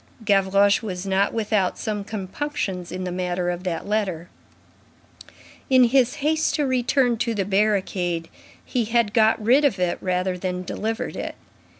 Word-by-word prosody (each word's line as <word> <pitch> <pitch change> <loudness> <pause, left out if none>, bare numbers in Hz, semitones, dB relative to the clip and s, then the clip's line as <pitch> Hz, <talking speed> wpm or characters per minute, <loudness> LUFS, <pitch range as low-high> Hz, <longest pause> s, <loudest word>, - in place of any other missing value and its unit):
Gavroche 200 0 +3
was 185 -4 -5
not 195 +1 +1
without 210 -4 0
some 210 -2 -3
compunctions 195 - -4
in 185 0 -4
the 180 - -3
matter 180 0 -1
of 175 +1 -5
that 175 +1 -3
letter. 190 -5 -2 1.4
In 260 -1 +6
his 250 0 +3
haste 315 +1 +1
to 295 - +1
return 250 -1 +1
to 230 0 -1
the 195 -2 -1
barricade, 190 -4 0 0.4
he 240 -3 -1
had 225 -1 +1
got 220 -1 +4
rid 245 +7 +4
of 275 -9 +2
it 180 -1 -1
rather 180 0 -1
than 180 0 -3
delivered 220 +4 -3
it. - - -5
200 Hz, 155 wpm, -23 LUFS, 185-230 Hz, 1.4 s, In